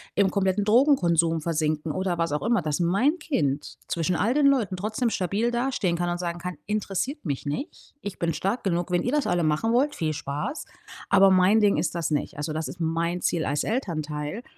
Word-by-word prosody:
im 200 -2 +3
kompletten 200 0 +1
Drogenkonsum 175 - +3
versinken 155 -1 -1
oder 185 -2 -1
was 165 -3 -1
auch 150 - -1
immer, 230 -3 +2
dass 150 0 -2
mein 200 - +2
Kind 145 - -2
zwischen 170 +1 0
all 230 +8 +1
den 290 -1 +4
Leuten 235 -9 +2
trotzdem 215 +5 -1
stabil 205 +4 0
dastehen 240 -7 0
kann 175 0 -1
und 175 - -2
sagen 175 -1 -3
kann: 180 +1 -5
„Interessiert 210 - -2
mich 145 -2 -3
nicht. 150 - -6
Ich 205 - -6
bin 165 -1 0
stark 200 +9 -2
genug, 175 -1 -1
wenn 175 - +1
ihr 250 - -1
das 295 -2 +1
alle 175 -1 +1
machen 155 +9 +1
wollt, 285 +4 +2
viel 155 -2 -1
Spaß. 150 - -4 0.4
Aber 195 0 +6
mein 190 +4 +5
Ding 205 -5 +3
ist 160 +1 -1
das 165 -2 -2
nicht.“ 145 - -1
Also, 150 +2 -3
das 155 -1 -3
ist 155 +7 -9
mein 165 +2 -1
Ziel 165 -3 0
als 145 +1 0
Elternteil. 155 - -3
180 Hz, 205 wpm, -25 LUFS, 160-220 Hz, 0.4 s, Aber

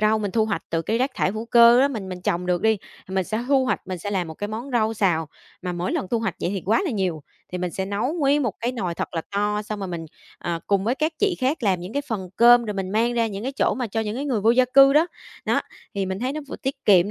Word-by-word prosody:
rau 215 +1 +3
mình 205 -2 -2
thu 220 +1 +2
hoạch 215 -2 -2
từ 165 0 0
cái 225 +7 0
rác 265 +2 +1
thải - - +1
hữu 220 +2 -4
cơ 235 +1 +7
đó, 275 - +4
mình 215 -8 -5
mình 180 -1 -6
trồng 180 0 -1
được 180 -1 0
đi, 220 -2 +3 0.3
mình 190 -1 0
sẽ 220 +5 -3
thu 270 -2 +4
hoạch, 255 - 0
mình 185 -2 -4
sẽ 205 +4 -5
làm 180 -4 -1
một 160 - -7
cái 205 +4 -4
món 230 +6 -5
rau 225 -1 +2
xào. 170 -7 +1 0.3
Mà 180 -1 -3
mỗi 175 +1 -2
lần 190 - -2
thu 235 - +1
hoạch 225 - -2
vậy - - -1
thì 195 -3 -3
quá 225 - +3
là 335 - -1
nhiều, 185 -8 -1 0.3
thì 180 - -2
mình 180 0 -2
sẽ 190 +2 -3
nấu 205 +9 -1
nguyên 290 -3 +2
một 230 -6 -1
cái 240 +2 -1
nồi 185 -8 -3
thật - - -5
là 165 - 0
to, 210 +1 0
xong 210 0 -5
rồi 195 - -4
mình, 165 -2 -5 0.3
à, 170 -1 -3
cùng 200 -1 +1
với 235 - +1
các 310 +3 0
chị 410 -3 +2
khác 265 +1 0
làm 190 -4 +2
những 180 +5 -7
cái 285 - -1
phần 195 -6 -3
cơm 240 0 +7
rồi 210 -2 -3
mình 190 -1 -3
mang 230 +3 +2
ra 230 -1 +2
những 205 -1 -5
cái 265 +2 -3
chỗ - - +1
mà 250 -2 -2
cho 225 +2 -2
những 215 -1 -3
cái 280 - -3
người 245 -7 0
vô 220 - +4
gia 255 +2 +5
cư 275 +2 +6
đó, 310 +4 +5 0.4
đó. - - +2 0.3
Thì 195 -1 -1
mình 190 +1 -3
thấy 255 +2 -1
nó 305 - -4
vừa - - -6
tiết 270 0 -5
kiệm 195 0 +5
215 Hz, 305 wpm, -23 LUFS, 190-245 Hz, 0.4 s, cơ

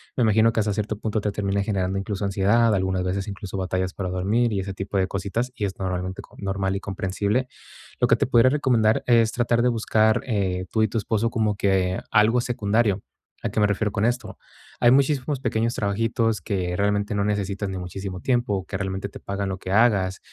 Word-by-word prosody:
me 125 - +2
imagino 110 +1 +4
que 110 - +2
hasta 105 - 0
cierto 105 0 -2
punto 110 +1 -2
te 105 -1 -2
termina 100 -1 -1
generando 95 -2 -1
incluso 100 0 -4
ansiedad, 105 +4 +3
algunas 95 -1 0
veces, 95 +1 -2
incluso 100 -1 -6
batallas 95 0 -2
para 95 - -4
dormir 105 +6 +1
y 95 - 0
ese 95 0 -5
tipo 95 +1 -4
de 95 -1 +2
cositas, 100 +6 -2
y 105 - -3
es 95 - -4
normalmente 95 0 -3
co - - -18
normal 95 0 -1
y - - -4
comprensible. 100 +5 -2 0.5
Lo - - +3
que - - +5
te - - 0
pudiera 120 +1 +5
recomendar 125 -6 +2
es 115 -2 +4
tratar 120 -1 +1
de 125 - +3
buscar, 110 -2 +2
eh, 95 -6 -1
tú 110 - +1
y 110 - +3
tu 115 - -3
esposo 110 +1 0
como 110 -3 0
que 95 -2 +1
algo 110 +3 +4
secundario, 110 -4 +1 0.4
¿a - - 0
qué - - -2
me 105 - +4
refiero 105 +1 0
con 105 +1 0
esto?, 120 -2 -2 0.4
hay 120 - +6
muchísimos 140 0 +2
pequeños 115 -2 0
trabajitos 115 +2 0
que 90 -4 -2
realmente 100 +2 0
no 100 - +1
necesitan 100 -1 -2
ni 95 - -4
muchísimo 90 +1 -6
tiempo, 120 -7 0
que 95 - -7
realmente 95 +1 -3
te - - -12
pagan 100 0 -3
lo 95 -1 -3
que 95 0 -6
hagas, 100 -4 +3
100 Hz, 210 wpm, -24 LUFS, 95-115 Hz, 0.5 s, hay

